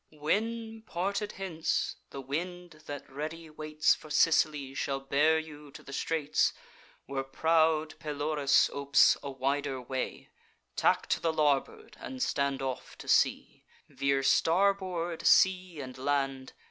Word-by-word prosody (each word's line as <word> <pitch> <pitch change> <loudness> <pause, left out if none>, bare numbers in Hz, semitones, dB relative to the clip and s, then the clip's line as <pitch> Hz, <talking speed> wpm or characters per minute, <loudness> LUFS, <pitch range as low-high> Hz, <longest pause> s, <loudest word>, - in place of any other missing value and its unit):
'When, 225 +9 -2
parted 200 +1 -3
hence, 175 -5 -2
the 135 - -7
wind, 170 +3 -5
that 145 0 -7
ready 155 +3 -6
waits 155 0 +1
For 155 - -10
Sicily, 150 -3 +2
shall 135 0 -2
bear 145 +4 +2
you 150 -2 -8
to - - -11
the 140 - -10
straits 155 0 0 0.5
Where 135 0 -3
proud 160 +2 +1
Pelorus 145 -2 +1
opes 140 0 +4
a 140 - -5
wider 135 0 -2
way, 130 +1 -5 0.5
Tack - - +2
to - - +1
the 165 - 0
larboard, 155 - 0
and 260 -1 -4
stand 140 -1 -1
off 130 -1 -5
to - - -11
sea: - - +1 0.3
Veer 140 0 0
starboard 175 +2 +1
sea 185 -3 +4
and 130 -1 -8
land. 135 -1 -1
155 Hz, 135 wpm, -30 LUFS, 140-170 Hz, 0.5 s, opes